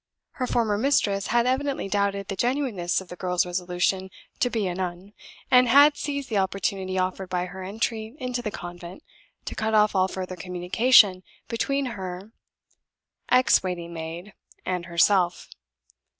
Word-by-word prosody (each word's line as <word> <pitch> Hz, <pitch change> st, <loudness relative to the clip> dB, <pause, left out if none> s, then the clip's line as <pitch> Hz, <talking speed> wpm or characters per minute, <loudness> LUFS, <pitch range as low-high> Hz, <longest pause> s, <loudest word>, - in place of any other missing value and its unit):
Her 255 Hz, -, -3 dB
former 215 Hz, -4 st, +1 dB
mistress 205 Hz, -7 st, +1 dB
had 235 Hz, +1 st, +2 dB
evidently 265 Hz, -1 st, -1 dB
doubted 200 Hz, -1 st, -1 dB
the 195 Hz, -, -4 dB
genuineness 235 Hz, -7 st, 0 dB
of 185 Hz, -, -13 dB
the 180 Hz, -, -7 dB
girl's 180 Hz, 0 st, 0 dB
resolution 180 Hz, +1 st, -1 dB, 0.3 s
to 245 Hz, -, +2 dB
be 225 Hz, -4 st, -1 dB
a 180 Hz, -, -1 dB
nun, 185 Hz, +2 st, -5 dB, 0.4 s
and 250 Hz, 0 st, +6 dB
had 285 Hz, +4 st, +7 dB
seized 280 Hz, -2 st, -4 dB
the 215 Hz, -5 st, 0 dB
opportunity 190 Hz, -1 st, -2 dB
offered 185 Hz, 0 st, -2 dB
by 180 Hz, -1 st, -1 dB
her 190 Hz, +1 st, -9 dB
entry 220 Hz, +4 st, -3 dB
into 250 Hz, -2 st, -3 dB
the 225 Hz, -, -3 dB
convent 175 Hz, -1 st, -9 dB, 0.4 s
to -, -, -5 dB
cut 220 Hz, 0 st, -1 dB
off 210 Hz, 0 st, +4 dB
all 190 Hz, -1 st, +3 dB
further 185 Hz, -1 st, -5 dB
communication 185 Hz, +3 st, +4 dB, 0.3 s
between 275 Hz, +4 st, -1 dB
her 190 Hz, +2 st, -7 dB, 1.0 s
ex 255 Hz, +1 st, +5 dB
waiting 175 Hz, -2 st, -5 dB
maid 165 Hz, +4 st, -7 dB, 0.3 s
and 180 Hz, -2 st, -2 dB
herself. 175 Hz, +1 st, +2 dB
195 Hz, 150 wpm, -25 LUFS, 180-235 Hz, 1.0 s, had